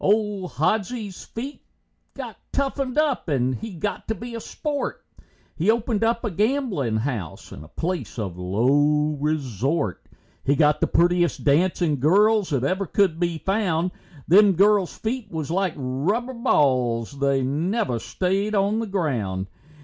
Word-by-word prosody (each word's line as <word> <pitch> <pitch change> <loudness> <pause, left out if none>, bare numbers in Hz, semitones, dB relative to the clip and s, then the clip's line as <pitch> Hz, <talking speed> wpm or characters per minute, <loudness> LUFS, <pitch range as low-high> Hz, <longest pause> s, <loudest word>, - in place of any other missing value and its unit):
Old 205 -3 +1
Hodsie's 205 - -1
feet 265 +6 -7 0.5
got - - -6 0.2
toughened 275 -1 -1
up, 295 - +1
he 135 - -1
got 200 +5 -4
to 220 - -1
be 240 +4 -8
a 230 - -4
sport, 290 +5 -4 0.5
He 175 +6 0
opened 225 -1 +1
up 230 +1 +1
a 215 - -1
gamblin' 205 - 0
house 110 - -4
and 70 - -9
a - - -13
place 165 - -4
of 100 -6 -3
low 145 +11 +2
resort; 140 - -1 0.4
He 140 - +2
got 150 0 +3
the - - +3
prettiest 175 0 +2
dancing 155 0 +2
girls 205 - +4
that 135 -5 0
ever 190 +7 0
could 185 -5 +2
be 170 -2 0
found, 180 -2 0 0.4
Them 200 +4 +6
girls' 200 0 +3
feet 225 -1 -3
was 160 -3 -4
like 185 -1 +1
rubber 160 - -1
balls 130 - +1
and 140 - -12
they 140 -1 +2
never 145 - 0
staid 195 - -1
on 200 +2 +2
the 230 - -2
ground. 120 - -1
175 Hz, 150 wpm, -24 LUFS, 140-215 Hz, 0.5 s, Them